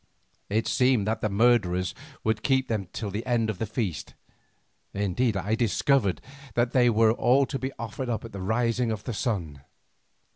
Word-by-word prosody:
It 110 +3 +1
seemed 125 -5 +3
that 110 +1 -1
the 110 - 0
murderers 100 -5 +2 0.3
would 110 0 0
keep 130 0 +1
them 105 -5 -2
till 105 -3 -4
the 105 +4 -3
end 115 -3 +1
of 95 - -10
the 110 - -2
feast, 100 - -4 0.8
indeed 100 +3 0
I 100 +3 -1
discovered 115 - +1 0.3
that 120 0 +2
they 125 -2 +4
were 110 0 +4 0.3
to 135 0 -4
be 130 +1 -3
offered 115 +3 -5
up 115 -1 -2
at 115 - -9
the 100 - -7
rising 115 +3 0
of 110 -1 -4
the 120 - -4
sun. 90 - -3
110 Hz, 175 wpm, -26 LUFS, 100-120 Hz, 0.8 s, they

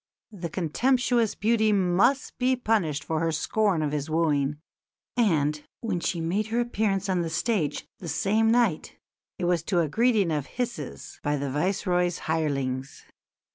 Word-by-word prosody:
The 180 -5 -6
contemptuous 240 - +1
beauty 220 0 +2
must 195 +7 +2
be 255 +1 +3
punished 200 - 0
for 160 -1 -1
her 165 0 +1
scorn 185 +1 +1
of 150 - -1
his 150 0 -3
wooing; 150 -3 +1 0.6
and, 150 -10 +2 0.2
when 210 -7 -1
she 170 +1 -1
made 185 +6 -1
her 230 +2 0
appearance 210 -5 0
on 185 -2 +1
the 165 - -2
stage 165 -3 -1
the 170 - -6
same 220 +6 +2
night 230 -9 +1 0.4
it 180 - -2
was 175 -2 +2
to 180 -3 +1
a 160 - 0
greeting 215 - +2
of 150 -3 -1
hisses 245 -1 -5
by 145 0 0
the 140 -1 -3
Viceroy's 180 +2 0
hirelings. 135 -5 -2
180 Hz, 155 wpm, -26 LUFS, 155-220 Hz, 0.6 s, be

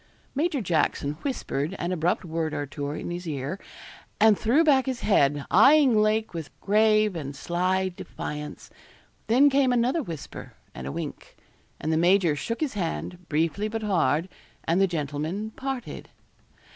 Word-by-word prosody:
Major 295 -1 0
Jackson 155 -5 0
whispered 190 - -3
an 175 - -3
abrupt 175 +1 0
word 160 -1 -2
or 145 - -2
two 145 +1 -5
in 150 +3 -5
his 175 0 -5
ear, 145 +4 -4 0.6
and 220 0 +6
threw 245 +11 +3
back 275 -4 +4
his 260 -2 -2
head, 145 -8 +2
eyeing 270 +4 +6
Lake 215 0 +2
with 165 -3 -5
grave 215 -1 +3
and 145 -3 -5
sly 185 +5 0
defiance. 150 -4 -7 0.6
Then 255 +6 +5
came 275 -2 +3
another 245 +6 +2
whisper 165 - -8 0.2
and 65 - -7
a - - -3
wink; - - -7 0.4
and 160 - -1
the - - +2
major 175 -2 +4
shook 230 - -4
his 300 -4 -1
hand, 180 -1 -4
briefly 165 +7 0
but 220 0 -4
hard, 170 -5 +1 0.4
and 170 +4 +1
the 195 - +5
gentlemen 160 +6 -3
parted. 265 0 -6
185 Hz, 155 wpm, -26 LUFS, 155-225 Hz, 0.6 s, and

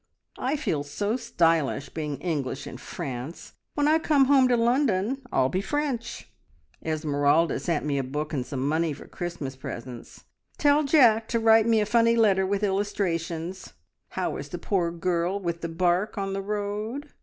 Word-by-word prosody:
I 265 +4 0
feel 170 - -1
so 200 +10 -2
stylish 165 - +1
being 150 -3 -4
English 140 -5 -2
in 125 - -8
France. 130 +4 -7 0.2
When 290 0 +2
I 315 +1 +4
come 290 -4 +3
home 265 -1 +5
to 245 -1 +3
London, 240 0 +1
I'll 130 - +3
be 185 +8 -1
French! 250 -2 -3 0.6
"`Esmeralda 155 0 +1
sent 165 -4 -1
me 140 -2 0
a - - -1
book 150 +4 -4
and 135 -4 -1
some 135 +1 -3
money 160 +1 +1
for - - -11
Christmas 170 -7 -5
presents. 125 -2 -8 0.3
Tell 290 +1 +4
Jack 240 -7 +5
to 230 - 0
write 225 0 +5
me 225 -2 +4
a - - +1
funny 230 +1 +3
letter 195 -4 +3
with 200 +1 -1
illustrations. 185 -3 -2 0.4
How - - -2
is - - -7
the - - -5
poor 180 -4 0
girl 175 +2 -1
with 170 -3 -3
the 170 - -3
bark 180 +5 0
on 195 -1 -2
the 195 - -2
road? 210 +7 -4
185 Hz, 170 wpm, -26 LUFS, 155-230 Hz, 0.6 s, home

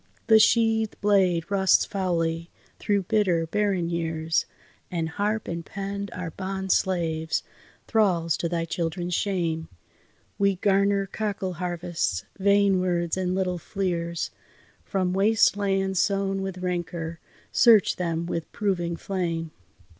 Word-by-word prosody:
The 220 -1 +6
sheathèd 225 -1 +3
blade 190 -4 +2
rusts 190 -1 +4
foully, 170 -4 -1 0.3
through 200 -2 +1
bitter, 185 -5 +2
barren 195 -1 0
years, 165 -1 -1 0.4
And 165 -2 -2
harp 210 +5 -1
and 170 0 -4
pen 200 +2 -5
are 180 -3 -5
bond 190 +1 -3
slaves, 160 -4 0 0.4
thralls 175 -8 +2
to 170 - -2
thy 165 -1 -1
children's 175 +1 -3
shame. 165 -5 -1 0.7
We 200 -1 +3
garner 200 +1 +2
cockle 200 -2 -3
harvests, 175 - -2
vain 200 -1 +4
words 175 -2 0
and 185 -1 -1
little 180 -2 -1
fleers. 170 -3 -2 0.5
From 185 -2 -1
waste 210 +3 +4
lands 195 -2 0
sown 195 -1 0
with 190 -1 -4
rancour, 170 -2 -3 0.3
search 225 -5 +5
them 170 -2 -1
with 170 -1 -4
proving 175 -5 -1
flame! 165 -3 -3
185 Hz, 125 wpm, -26 LUFS, 170-200 Hz, 0.7 s, The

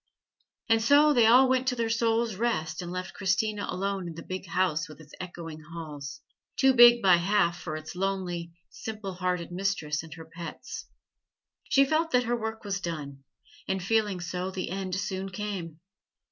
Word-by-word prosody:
And 225 -2 +4
so 290 +6 +6
they 235 -4 +5
all 255 +3 +7
went 260 0 +1
to 250 - +2
their 230 -1 0
soul's 230 0 +1
rest 185 -8 -1
and 175 -1 -6
left 185 0 -5
Christina 205 +2 0
alone 195 -1 -2
in 165 - -7
the 165 - -8
big 185 0 -6
house 165 -3 0
with 155 - -12
its 150 -1 -15
echoing 170 -3 -7
halls 155 - -8 0.3
too 265 0 +4
big 240 -2 +8
by 185 -3 +7
half 175 -1 +2
for 155 -3 -4
its 155 +2 -7
lonely, 180 -3 -2 0.2
simple 215 -3 -6
hearted 180 -1 -2
mistress 175 -5 -1
and 160 -1 -12
her 165 -1 -10
pets. 170 +8 -8 0.8
She 275 0 +5
felt 315 +3 +1
that 250 0 +4
her 240 0 0
work 220 -1 -4
was 200 -1 -3
done, 145 -6 -5 0.4
and 190 -1 -1
feeling 210 -2 +1
so, 180 +1 -3
the 185 -2 -4
end 190 -1 -3
soon 195 0 -3
came. 185 -5 -5
190 Hz, 175 wpm, -28 LUFS, 170-225 Hz, 0.8 s, big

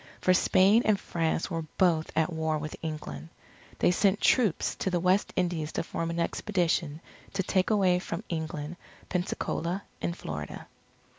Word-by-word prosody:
For 185 - +4
Spain 195 +4 +5
and 215 -2 +3
France 165 +2 -1
were 165 -1 -1 0.2
both 165 -4 +3
at 160 +2 +1
war 160 -1 0
with 155 0 -5
England. 80 - -5 0.5
They - - +4
sent 195 +2 +3
troops 220 -10 +3
to - - -1
the 180 -1 +1
West 185 +3 +2
Indies 170 -4 -1
to - - -1
form 165 0 -3
an 170 0 -2
expedition 170 -4 0 0.3
to 195 -1 0
take 185 0 +1
away 190 -4 +3
from 180 +1 -5
England, 160 0 -4 0.3
Pensacola, 180 0 -2 0.2
in 170 - -1
Florida. 75 - -6
170 Hz, 155 wpm, -29 LUFS, 160-185 Hz, 0.5 s, Spain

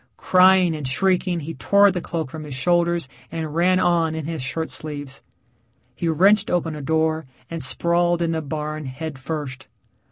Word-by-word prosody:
Crying 185 -2 +4
and 150 -4 -4
shrieking, 180 +4 +1
he 160 +3 -6
tore 200 +2 +4
the 180 -1 -3
cloak 160 -6 -4
from 160 -1 -7
his 145 -3 -7
shoulders 170 +2 +1 0.2
and 160 -2 -4
ran 180 +3 +3
on 170 -3 +2
in 160 -2 -4
his 160 -3 -4
shirt 160 +5 -3
sleeves. 145 -3 -7 0.7
He 145 +7 -3
wrenched 195 +6 +4
open 165 -3 -1
a 150 - -6
door 160 0 0 0.2
and 165 -1 -4
sprawled 170 +5 +2
in 165 - 0
the 160 -1 -1
barn 155 0 -5
head 140 +2 -6
first. 135 -4 -5
160 Hz, 170 wpm, -22 LUFS, 150-175 Hz, 0.7 s, Crying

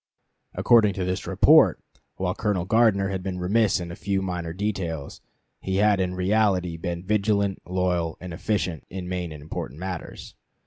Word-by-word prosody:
According 105 -5 +4
to 95 - -2
this 90 0 -3
report, - - +5 0.4
while - - -1
Colonel 100 -5 -1
Gardner 105 -2 +3
had 95 -1 -3
been 90 -1 -4
remiss 100 +3 +2
in 85 -1 -6
a - - -7
few 95 -1 -1
minor 90 -3 -3
details, 90 -6 -4 0.4
he 95 - -3
had 105 0 +3
in 90 -1 -1
reality 95 -2 +1
been 85 +1 -4
vigilant, 100 -1 +1
loyal, 90 -2 -1
and 90 -2 -7
efficient 90 -3 -2
in 90 -1 -6
main 90 -2 -3
and 75 -2 -9
important 75 -2 -6
matters. 90 -2 -6
95 Hz, 165 wpm, -25 LUFS, 85-100 Hz, 0.4 s, report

